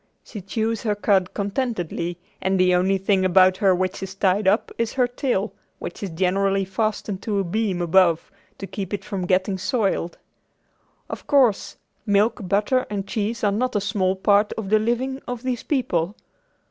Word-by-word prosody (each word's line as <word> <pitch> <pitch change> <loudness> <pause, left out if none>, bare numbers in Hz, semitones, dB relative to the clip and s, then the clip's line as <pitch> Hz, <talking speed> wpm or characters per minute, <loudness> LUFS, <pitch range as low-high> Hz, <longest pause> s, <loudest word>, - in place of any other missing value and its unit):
She 210 - -8
chews 220 +3 -2
her 210 -2 0
cud 195 -3 +2
contentedly 200 -5 -2 0.2
and 190 0 +1
the 180 0 +4
only 190 +2 +2
thing 190 0 +1
about 185 0 +5
her 195 -3 +3
which 185 +1 -2
is 190 0 -6
tied 195 +1 +1
up 205 +4 +2
is 230 -1 -1
her 255 -2 +3
tail, 245 -4 -2 0.2
which - - -7
is 200 - -3
generally 195 +3 +1
fastened 205 -1 -2
to 210 -3 -2
a 195 - +1
beam 190 -1 -1
above 175 -1 +3 0.3
to 195 - -6
keep 195 0 -4
it - - -9
from 185 -3 -3
getting 190 +1 +1
soiled. 195 -6 -1 0.9
Of - - -8
course, 255 -8 +2 0.3
milk, 210 +2 +2
butter 210 +7 +1
and 200 -2 -3
cheese 220 +2 -2
are 205 - +3
not 250 +4 -1
a - - +3
small 195 -2 0
part 205 +2 +3
of 210 -3 -5
the 215 - +5
living 250 +4 -1
of 245 -1 -5
these 255 -2 -2
people. 200 - -1
200 Hz, 175 wpm, -23 LUFS, 185-220 Hz, 0.9 s, about